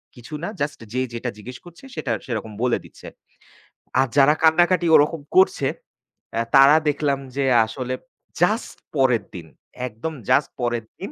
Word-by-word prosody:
কিছু 120 +4 -12
না। - - -2
জাস্ট 145 +1 -2
যে 130 - -1
যেটা 120 +1 -3
জিজ্ঞেস 125 +5 -9
করছে 175 +7 -15
সেটা 145 -6 -3
সেরকম 110 -3 -4
বলে 125 - +2
দিচ্ছে। - - -14 0.9
আর 135 - +3
যারা 140 +2 +6
কান্নাকাটি 175 +2 +4
ওরকম 150 +1 +3
করছে 185 -7 +4 0.7
অ্যা 115 +1 0
তারা 135 +3 +8
দেখলাম 145 -1 0 0.2
যে 140 -1 0 0.2
আসলে 130 +2 -5 0.5
জাস্ট 215 +6 +1 0.2
পরের 125 -6 +2
দিন। 85 -3 -8 0.4
একদম 120 +8 -6 0.2
জাস্ট 145 - +3
পরের 120 -2 -1
দিন। - - -6
135 Hz, 150 wpm, -22 LUFS, 120-155 Hz, 0.9 s, তারা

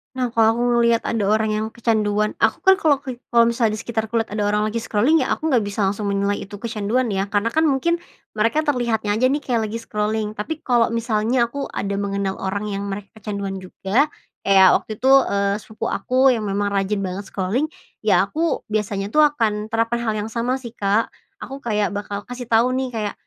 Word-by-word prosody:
Nah, 250 -2 -1
kalau 225 -1 +3
aku 240 - -2 0.2
ngeliat 235 -1 +3
ada 220 -4 -1
orang 215 +1 +2
yang 215 +1 -1
kecanduan 215 -2 0
aku - - +1
kan 385 0 +5
kalau 290 -6 +2
ke 255 -3 -6
kalau 235 -1 +5
misal 235 -1 +1
di 215 - -1
sekitarku 220 +1 -4
lihat 225 -2 0
ada 210 -1 -1
orang 210 0 +1
lagi 215 +2 -1
scrolling 230 +8 +2
ya 260 - 0
aku 315 0 -2
nggak 250 - +4
bisa 205 0 -2
langsung 200 +2 -1
menilai 200 0 0
itu 200 - -8
kecanduan 225 +2 -1
ya, 195 0 -1
karena 205 +3 0
kan 315 0 +2
mungkin 335 +5 +1 0.3
mereka 230 +8 +1
terlihatnya 235 -7 0
aja 230 +5 +3
nih 285 +2 -1
kayak 230 -5 0
lagi 215 - -6
scrolling, 215 -1 -2
tapi 215 +10 -5
kalau 240 -2 +3
misalnya 230 +1 +1
aku 280 +1 -4
ada 200 0 -3
mengenal 200 -1 -2
orang 195 +2 -2
yang 200 0 -3
mereka 200 0 -6
kecanduan 200 -2 -4
juga, 195 +8 0 0.4
kayak 190 -1 +7
waktu 215 - -8
itu, 265 - +5 0.2
eee, 200 0 +1
sepupu 220 +1 -5
aku 260 +1 +3
yang 220 -4 -1
memang 200 +1 -1
rajin 195 0 0
banget 190 +2 -5
scrolling, 200 +11 -1 0.3
ya - - +3
aku 325 +1 -1
biasanya 205 -1 -2
tuh 305 - +2
akan 225 -8 +2
terapkan 230 +1 0
hal 220 -2 -1
yang 215 +1 -4
sama 240 +3 0
sih, 250 -4 -7
Kak. 210 0 0 0.3
Aku 270 0 -7
kayak 210 -5 -1
bakal 205 0 -5
kasih 245 -1 -8
tau, 235 +2 +3
nih, 260 0 -1
kayak, 220 -4 -3
220 Hz, 205 wpm, -21 LUFS, 205-245 Hz, 0.4 s, kayak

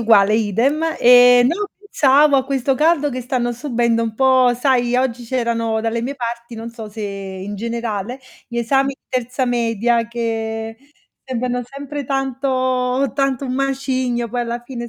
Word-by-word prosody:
uguale 215 -2 +4
idem. 225 +8 +1 0.2
Ehm, 245 0 +7
no, 410 +9 -1
pensavo 290 -7 +3
a 260 - +1
questo 270 -1 0
caldo 300 +1 +2
che 255 -2 -5
stanno 240 -1 -1
subendo 235 -3 0
un 225 -1 -3
po' 260 -1 +4
sai, 245 -1 +1
oggi 250 -2 -1
c'erano 230 -2 -1
dalle 230 +1 -2
mie 275 +3 -3
parti, 235 -2 -5
non 225 +1 -7
so 225 -2 -9
se 215 +1 -9
in 195 0 -6
generale, 230 +2 -4 0.3
gli 235 0 -5
esami 270 +3 +2
di - - -63
terza 255 +1 -2
media 235 -1 +1
che 225 -1 -3 0.5
sembrano 250 -1 -2
sempre 280 +3 -7
tanto 260 -1 0
tanto 275 -1 0
un 255 - -3
macigno, 260 -3 -1
poi 245 +2 -2
alla 235 0 -4
fine 240 -1 -7
245 Hz, 155 wpm, -19 LUFS, 230-265 Hz, 0.5 s, Ehm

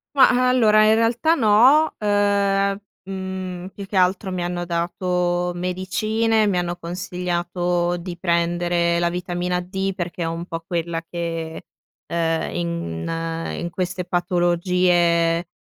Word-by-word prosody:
Ma, 255 -2 +5
allora, 215 -4 +5
in 215 +1 +5
realtà, 240 +8 +2
no. 255 +7 +5
Ehm, 200 -1 +1 0.3
mhmm, 190 -1 -5
più 200 0 -9
che 195 - -8
altro 185 +1 +2
mi 175 -1 -2
hanno 175 0 -3
dato 175 +1 -1
medicine, 215 +5 0
mi 185 -3 +1
hanno 175 0 -1
consigliato 175 0 -2
di 175 0 -6
prendere 170 0 +1
la 170 0 +1
vitamina 180 0 -2
D 190 +1 -3
perché 175 -1 -4
è - - -1
un 165 +1 -4
po' 165 -1 -6
quella 170 -1 -2
che, 165 -2 -4 0.4
ehm, 165 -1 -1
in 165 - -3
in 170 - -3
queste 180 +1 -3
patologie, 175 -1 +2
180 Hz, 125 wpm, -22 LUFS, 170-195 Hz, 0.4 s, Ma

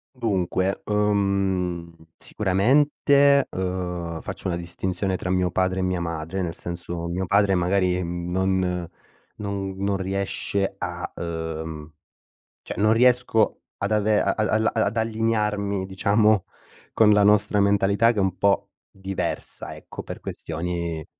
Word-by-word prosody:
Dunque, 95 -4 0
uhm, 100 -4 0 0.3
sicuramente, 140 +7 +3
uhm, 90 -3 -3
faccio - - -6
una 85 - -1
distinzione 90 +2 -2
tra 90 - -4
mio 90 -1 +1
padre 95 +1 0
e - - 0
mia 90 -1 0
madre, 85 +2 -3
nel 85 -3 -2
senso, 85 0 -5
mio 90 +2 -2
padre 100 +1 +3
magari 90 0 +1
non 90 +1 -1 0.5
non 100 -2 -4
non 100 +1 0
riesce 95 +1 -2
a 90 -1 -4
uhm, 80 -2 -5 0.7
cioè - - -7
non 105 +3 +4
riesco 125 -2 +3 0.2
ad 100 +1 -2
ave 105 0 +3
a 100 - +2
al 110 +1 +2
ad 110 0 0
allinearmi 105 -3 0
diciamo 100 +1 +2 0.5
con 110 -1 +5
la 105 -1 +5
nostra 105 0 +4
mentalità, 100 +3 +3
che 110 - -2
è - - +3
un 95 -1 0
po' 100 +1 +2 0.2
diversa, 95 0 -4
ecco, - - -9
per - - -8
questioni 85 -1 -4
95 Hz, 130 wpm, -24 LUFS, 90-105 Hz, 0.7 s, con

